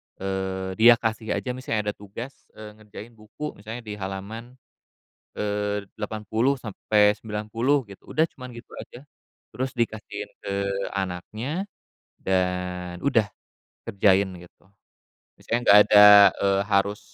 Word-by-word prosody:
eee, 95 0 -3
dia 120 +1 +8
kasih 110 -1 -2
aja. 125 - -3
Misalnya 115 -5 -2
ada - - -15
tugas, 115 +7 -10
eee, 105 -1 -10
ngerjain 110 +2 -11
buku 115 +7 -8
misalnya 110 +3 -8
di 105 -2 -7
halaman, 100 +6 -7 0.8
eee, 105 0 -2
80-90 110 +2 0
gitu, 100 -3 -15
udah 160 - +5
cuman 125 -1 -10
gitu 120 - -13
aja. 125 +3 -12 0.5
Terus 130 +1 -4
dikasihin 110 -2 -3
ke 100 - -5 0.4
anaknya, 110 - -4 0.5
dan 90 -1 -2
udah 115 -7 +2 0.6
kerjain 100 -2 +3
gitu. 90 +2 -19 0.7
Misalnya 120 +1 -1
nggak 105 -2 +8
ada, 105 0 +9 0.3
eee, 100 0 +1
harus 100 0 +1
105 Hz, 115 wpm, -24 LUFS, 100-115 Hz, 0.8 s, ada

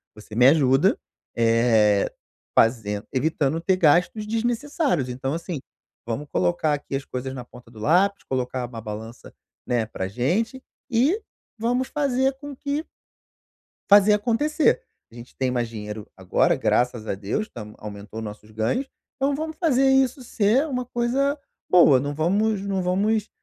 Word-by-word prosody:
Você 105 0 -11
me 125 +2 +6
ajuda, 140 +3 +4 0.4
eh, 115 -3 +3 0.5
fazen 110 -3 +2
evitando 150 +2 0
ter 190 +2 +2
gastos 180 +6 +3
desnecessários, 240 - -1
então 130 +2 -3
assim, 170 -1 -4 0.5
vamos 120 +6 -3
colocar 95 - +1
aqui 140 -1 -4
as 135 - -2
coisas 130 +1 -5
na 125 -2 -6
ponta 125 -1 -15
do 115 -2 -14
lápis, 185 - +2
colocar 130 -1 -2
uma 120 -2 -8
balança, 110 +2 -8 0.3
né, 120 -3 +1
para 95 -3 -5
gente 185 - -1 0.3
e 270 - +2 0.4
vamos 245 +3 0
fazer 270 -2 +1
com 290 -1 -8
que" 285 +4 -3 1.0
"fazer 205 +1 +7
acontecer, 255 - +2 0.3
a - - -16
gente 120 +1 -11
tem 130 -1 0
mais 120 -2 -1
dinheiro 105 -1 -7
agora 95 -1 +2
graças 120 -2 0
a - - -1
Deus 100 - -2
estamos 105 -2 -10
aumentou 105 +1 -8
os 115 - -5
nossos 105 +1 -10
ganhos, 110 - -1 0.3
então 275 +1 0
vamos 315 +1 -4
fazer 270 -6 +3
isso 265 0 +3
ser 230 +7 +2
uma 250 -4 -3
coisa 265 +5 0 0.3
boa, 170 -6 +7
não 145 +2 -3
vamos 200 +8 +1
não 195 -1 -1
vamos, 205 +4 +1
155 Hz, 150 wpm, -24 LUFS, -, 1.0 s, fazer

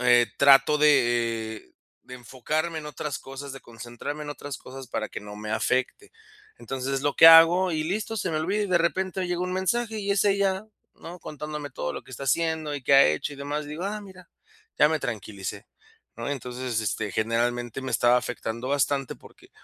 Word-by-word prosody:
Eh, 120 -1 +5
trato 140 +2 +6
de, 120 -6 +2
eh, - - -23 0.3
de 125 - -10
enfocarme 155 +7 -3
en 150 - -8
otras 150 -1 -5
cosas, 135 +1 -8
de 135 - -9
concentrarme 120 +6 -7
en 145 - -6
otras 145 -2 -7
cosas, 130 0 -10
para 110 -2 -3
que - - -6
no 105 0 -10
me 105 0 -6
afecte. 130 - -1 0.5
Entonces, 135 0 -4
es 135 - -1
lo 145 0 0
que - - +9
hago, 165 +2 +8
y 155 - -1
listo, 215 +5 -3
se 185 -3 -2
me 155 - -2
olvida. 195 +7 0
Y - - -3
de 175 -1 +3
repente 190 +2 -1
hoy, 185 - -1
llega 175 0 -2
un 180 - -2
mensaje, 220 +4 -1
y 200 -1 -3
es 200 0 +2
ella, 195 0 +1 0.3
¿no? 175 +2 -10
Contándome 150 -1 -6
todo 75 - -4
lo - - -6
que - - -18
está 130 - -8
haciendo, 160 +1 0
y 140 - -8
qué 140 - +3
ha 135 - +8
hecho, 75 - -1
y 145 - -10
demás. 145 +2 -4
Digo: 150 +4 -6
"Ah, 210 +1 -3
mira, 185 -3 -14 0.5
ya - - +6
me - - 0
tranquilicé", - - -5 0.5
¿no? - - -5
Entonces, 125 -3 -4
este, 105 0 -2
generalmente, 120 +2 -1
me 130 - -4
estaba 120 +1 +4
afectando 120 +1 -5
bastante, 140 -1 0
porque - - -18
145 Hz, 205 wpm, -26 LUFS, 125-170 Hz, 0.5 s, que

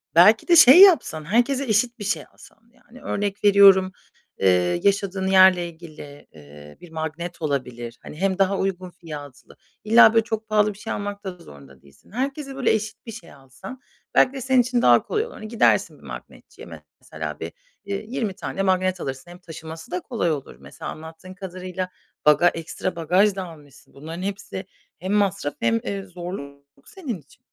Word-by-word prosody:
belki 210 +6 +6
de 345 - +5
şey 325 +3 +9
yapsan, 280 - +5
herkese 245 - +1
eşit 235 +1 0
bir - - -6
şey 205 +3 -2
alsa - - -18 0.2
Yani, 255 0 -18
örnek 205 0 -3
veriyorum, 195 -2 +6 0.5
eee, 90 -2 +2
yaşadığın 195 -1 0
yerle 185 -2 +5
ilgili, 155 -4 -13
ııı, 75 0 -15
bir 175 - -14
magnet 160 +2 -6
olabilir, 125 -5 -4
hani, 150 - -10
hem 190 +1 0
daha 195 0 +2
uygun 185 -1 -3
fiyatlı. 150 -6 -11 0.3
İlla, 225 +1 +6
böyle 225 -1 +4
çok 220 -1 -5
pahalı 210 -1 +2
bir 195 - -17
şey 225 - -5
almak 205 0 -5
da 185 -2 -6
zorunda 70 - -16
değilsin. 70 - -22
Herkese 275 +3 -4
böyle 270 - +1
eşit 220 +2 -4
bir 225 - -7
şey 170 - -12
alsan 135 - -12 0.4
belki 255 - +4
de 270 - -6
senin 260 0 +3
için 245 0 -1
daha - - +5
kolay 435 0 -2
olur. 480 - -11
Hani, 215 - -9
gidersin 225 +1 +1
bir - - -22
magnetçiye - - -11 0.3
mesela - - -7
bir, - - -6 0.4
ııı, 200 - -1
20 220 -2 -4
tane 195 - -5
magnet 185 -1 0
alırsın 135 +6 -6
hem 175 - -13
taşıması 160 -2 -10
da 180 - -2
kolay 220 -10 -2
olur. 140 - -5
Mesela 70 0 -9
anlattığın 160 +4 -11
kadarıyla 185 -1 -6 0.4
baga 150 +4 +5
ekstra 165 +2 -3
bagaj 185 +5 +2
da 190 - -4
almışsın. 150 -5 -15
Bunların 160 +5 -8
hepsi 195 0 -5 0.3
hem 185 +3 -3
masraf 195 -7 0
hem, 115 0 +1
eee, 200 -1 -4
zorluk 175 -6 -9 0.2
senin 310 - -6
için. 145 - -24
185 Hz, 175 wpm, -23 LUFS, 160-215 Hz, 0.5 s, şey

